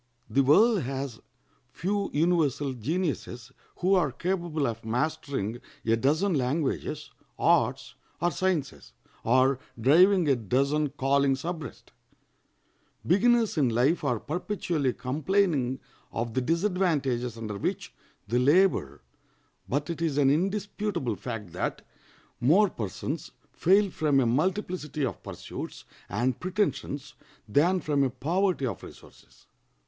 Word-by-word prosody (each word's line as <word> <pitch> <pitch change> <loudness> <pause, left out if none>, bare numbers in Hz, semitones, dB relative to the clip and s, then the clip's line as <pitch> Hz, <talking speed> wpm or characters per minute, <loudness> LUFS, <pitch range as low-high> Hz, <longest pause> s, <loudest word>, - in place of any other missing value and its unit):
The 140 - +4
world 200 - +5
has 135 -2 -4 0.5
few 200 +3 -2
universal 145 -4 +1
geniuses 135 - -3 0.2
who 185 +2 +1
are 170 -7 +3
capable 170 -1 -2
of 115 -2 -3
mastering 125 -2 -2 0.3
a 115 0 +3
dozen 155 - +1
languages, 135 +1 -1 0.3
arts, - - +2 0.3
or 175 +1 +1
sciences, 180 -8 -2 0.3
or 130 +2 +3 0.2
driving 175 - +5
a 140 - +4
dozen 140 +7 +1
callings 135 0 +1
abreast. 160 -7 -6 1.1
Beginners 225 +1 +3
in 135 -4 +3
life 125 +9 +2
are 120 -3 0
perpetually 165 - -1
complaining 145 -1 0 0.3
of 115 0 -3
the 130 - +1
disadvantages 155 - 0
under 105 -3 -5
which - - -3 0.3
they 120 +4 +1
labor; 140 - +3 0.7
but 145 +3 -1
it 165 - -6
is 155 -4 0
an 140 -2 +4
indisputable 195 - -1
fact 110 -5 -6
that 90 - -3 0.5
more 180 - +4
persons 105 -5 -4 0.2
fail 195 +2 +3
from 150 -4 +2
a 130 - +3
multiplicity 155 - -1
of 110 -9 -5
pursuits - - -8 0.2
and 125 0 0
pretensions 185 -7 -2 0.3
than 165 - +3
from 145 -3 0
a 135 - +2
poverty 165 +5 0
of 120 - -4
resources. - - -15
145 Hz, 120 wpm, -27 LUFS, 125-180 Hz, 1.1 s, world